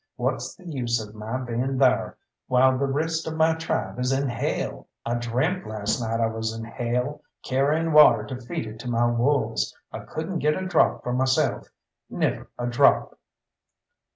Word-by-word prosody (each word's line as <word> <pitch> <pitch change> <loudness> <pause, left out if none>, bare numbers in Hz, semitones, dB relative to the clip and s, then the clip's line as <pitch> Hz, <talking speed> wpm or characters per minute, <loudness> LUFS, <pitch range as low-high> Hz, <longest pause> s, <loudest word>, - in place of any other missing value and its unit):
What's - - -2
the 185 - -18
use 120 -6 -1
of 105 -1 -8
my 110 +3 -4
being 125 +2 -2
thar, 130 -1 +2 0.3
while 130 +1 +4
the 140 +2 0
rest 160 +4 -1
of 160 - -3
my 160 0 +4
tribe 160 -5 -3
is 125 +1 0
in 135 0 +1
hell? 120 -2 -3 0.2
I 115 - -1
dreamt 125 +11 -1
last 110 +2 -2
night 115 0 -1
I 115 - +3
was 110 0 -3
in 115 - -6
hell, 125 +5 -2 0.2
carrying 150 +5 +1
water 150 0 +7
to 130 -2 -7
feed 120 -1 -4
it 110 0 -9
to 125 - -5
my 120 0 +2
wolves; 120 -1 +1
I - - -6
couldn't 165 +3 -4
get 150 +1 +2
a 185 - -4
drop 185 - +2
for 125 - -2
myself 130 +1 +1 0.4
never - - -2
a 120 - -3
drop." 120 0 +3
125 Hz, 180 wpm, -25 LUFS, 115-150 Hz, 0.4 s, water